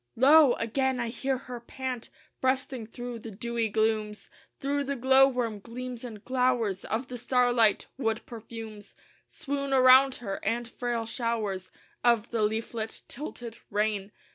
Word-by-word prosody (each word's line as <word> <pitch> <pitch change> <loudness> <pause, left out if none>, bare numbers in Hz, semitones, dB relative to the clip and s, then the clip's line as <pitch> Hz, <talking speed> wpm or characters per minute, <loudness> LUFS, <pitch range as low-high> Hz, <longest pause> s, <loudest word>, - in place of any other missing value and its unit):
Lo! 280 +1 +7
again 260 +3 0
I 235 -1 -1
hear 260 +3 -1
her 250 -1 -8
pant 250 0 -5 0.3
Breasting 260 -3 -1
through 240 +1 -6
the 225 - -8
dewy 230 +2 -2
glooms 215 -1 -1 0.3
Through 280 +1 -1
the 280 +1 -2
glow 265 +1 +6
worm 240 -5 -2
gleams 245 +3 -7
and 220 -4 -8
glowers 250 -6 +1
Of 235 +4 -2
the 250 -1 -7
starlight; 245 -3 +3
wood 225 -3 -1
perfumes 225 -2 -9 0.3
Swoon 280 -1 -3
around 260 +1 +7
her 195 -5 -5
and 240 0 -1
frail 240 -1 -3
showers 225 -5 -2 0.3
Of 235 -2 +3
the 230 -2 0
leaflet 220 +1 -2
tilted 240 -4 -7
rain. 205 -1 -1
235 Hz, 140 wpm, -28 LUFS, 220-255 Hz, 0.3 s, Lo